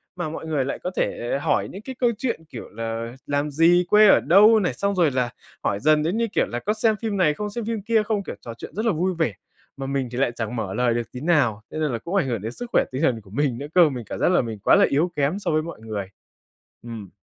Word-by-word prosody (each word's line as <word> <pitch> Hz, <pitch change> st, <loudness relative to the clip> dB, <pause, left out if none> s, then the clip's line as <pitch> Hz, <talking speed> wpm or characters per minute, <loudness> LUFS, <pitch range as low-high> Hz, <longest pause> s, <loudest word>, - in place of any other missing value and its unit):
mà 175 Hz, -4 st, -3 dB
mọi 160 Hz, -, -7 dB
người 145 Hz, -4 st, 0 dB
lại 140 Hz, -, -4 dB
có 180 Hz, -, -2 dB
thể 120 Hz, +3 st, -1 dB
hỏi -, -, 0 dB
những 195 Hz, -, -9 dB
cái 260 Hz, +3 st, -8 dB
câu 240 Hz, -2 st, +3 dB
chuyện 255 Hz, -9 st, -2 dB
kiểu 120 Hz, -, -8 dB
là 115 Hz, +1 st, -5 dB
làm 145 Hz, +1 st, -1 dB
gì, 170 Hz, +4 st, +4 dB
quê 210 Hz, 0 st, +7 dB
ở -, -, +7 dB
đâu 210 Hz, +8 st, +6 dB
này, 180 Hz, -11 st, 0 dB
xong 200 Hz, +8 st, -1 dB
rồi 170 Hz, -6 st, +3 dB
là 125 Hz, -2 st, 0 dB, 0.3 s
hỏi 100 Hz, -, 0 dB
dần 155 Hz, +2 st, +3 dB
đến 175 Hz, +8 st, 0 dB
như 230 Hz, -, +1 dB
kiểu 210 Hz, -, +1 dB
là 120 Hz, -, -4 dB
có 210 Hz, +10 st, -1 dB
xem 220 Hz, 0 st, +2 dB
phim 215 Hz, -3 st, -2 dB
này 155 Hz, -5 st, +3 dB
không, 210 Hz, +6 st, -4 dB
xem 230 Hz, +2 st, -5 dB
phim 225 Hz, -2 st, -2 dB
kia 225 Hz, +1 st, +2 dB
không, 210 Hz, -2 st, -1 dB
kiểu, -, -, -6 dB
trò 115 Hz, +1 st, -7 dB
chuyện -, -, -10 dB
rất 215 Hz, +3 st, -2 dB
là 230 Hz, -, +3 dB
vui 185 Hz, +2 st, 0 dB
vẻ, 160 Hz, -10 st, 0 dB, 0.4 s
mà 135 Hz, -, -5 dB
mình 135 Hz, -2 st, -2 dB
thì 125 Hz, -, -5 dB
lại 130 Hz, -3 st, +2 dB
chẳng 115 Hz, 0 st, -4 dB
mở 100 Hz, -4 st, -3 dB
lời 125 Hz, -1 st, +1 dB
được 120 Hz, -1 st, -3 dB
tí 125 Hz, -, -8 dB
nào. 140 Hz, -10 st, +2 dB
Thế 155 Hz, -, -5 dB
nên 150 Hz, -3 st, 0 dB
là 120 Hz, -, -1 dB
cũng 170 Hz, -, -5 dB
ảnh 180 Hz, -9 st, +2 dB
hưởng 115 Hz, -5 st, -2 dB
đến 110 Hz, +3 st, -4 dB
sức 245 Hz, -, -7 dB
khỏe -, -, +5 dB
tinh 130 Hz, +2 st, -3 dB
thần 125 Hz, -8 st, +1 dB
của 100 Hz, -, -18 dB
mình 135 Hz, -1 st, 0 dB
nữa 145 Hz, +4 st, -6 dB
cơ, 175 Hz, -4 st, +7 dB
mình 125 Hz, -5 st, -6 dB
cảm -, -, -6 dB
giác -, -, +3 dB
là 180 Hz, -, +4 dB
mình 115 Hz, -3 st, -6 dB
quá 100 Hz, -, +4 dB
là -, -, +6 dB
yếu 160 Hz, +6 st, +1 dB
kém 145 Hz, +7 st, 0 dB
so 205 Hz, -, -2 dB
với 155 Hz, 0 st, +2 dB
mọi 165 Hz, -7 st, -8 dB
người. 105 Hz, -3 st, -5 dB, 0.8 s
Ừm. 115 Hz, -5 st, -8 dB
150 Hz, 290 wpm, -23 LUFS, 120-195 Hz, 0.8 s, quê